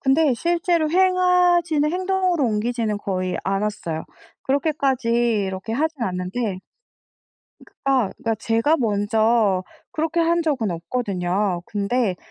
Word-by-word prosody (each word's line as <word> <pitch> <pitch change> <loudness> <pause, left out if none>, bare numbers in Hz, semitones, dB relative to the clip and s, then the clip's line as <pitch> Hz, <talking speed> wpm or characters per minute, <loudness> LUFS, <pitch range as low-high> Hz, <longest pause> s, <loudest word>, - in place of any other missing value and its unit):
근데 275 0 +3
실제로 335 +2 +1
행하지는 360 -4 +3
행동으로 370 -4 0
옮기지는 220 -1 -1
거의 185 -2 -2
않았어요. 195 -5 -2 0.4
그렇게까지 275 -3 0 0.4
이렇게 190 +4 -5
하진 300 +1 -1
않는데 185 +1 -2 1.0
그 - - -19
아 260 -6 +3
그러니까 225 0 -1
제가 230 +8 +1
먼저 215 -2 +2 0.3
그렇게 325 0 -1
한 335 +1 +2
적은 270 - 0
없거든요. 185 0 -2
근데 205 -1 -1
240 Hz, 285 characters per minute, -22 LUFS, 205-320 Hz, 1.0 s, 근데